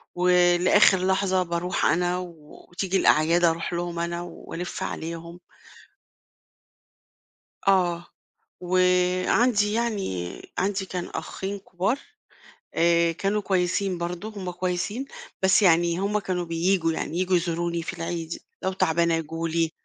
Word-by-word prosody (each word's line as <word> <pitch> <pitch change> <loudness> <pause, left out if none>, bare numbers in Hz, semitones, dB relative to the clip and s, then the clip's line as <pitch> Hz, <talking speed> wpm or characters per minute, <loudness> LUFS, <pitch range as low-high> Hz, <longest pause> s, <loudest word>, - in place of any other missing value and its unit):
ولآخر 180 +2 +5
لحظة 190 -1 +2
باروح 170 +1 -1
أنا 180 +1 +2
وتيجي 175 +2 -5
الأعياد 165 +1 +3
أروح 170 +1 +1
لهم 170 0 -3
أنا 170 0 -2
وألِّف 175 0 -6
عليهم. 170 +1 -6 2.3
آه، 175 -3 +2 0.5
وعندي 185 +5 +2
يعني 200 - -2 0.2
عندي 195 +1 0
كان 180 -2 -4
أخين 195 +1 -5
كبار، 195 +6 -2 0.8
آآ 170 0 +3
كانوا 200 +5 -1
كويسين 185 0 0
برضه، 175 +4 -4
هُم 200 -4 -6
كويسين، 180 +7 -2 0.4
بس 190 +2 +5
يعني 170 -2 +4
هُم 200 +2 0
كانوا 185 -3 -2
بييجوا، 165 0 +1
يعني 160 +1 -3
ييجوا 185 0 +2
يزوروني 170 0 -1
في 165 - -5
العيد، 165 -1 -4 0.2
لو 190 - 0
تعبانة 170 -2 +2
ييجوا 165 +1 -3
لي. 165 0 0
180 Hz, 115 wpm, -25 LUFS, 170-190 Hz, 2.3 s, ولآخر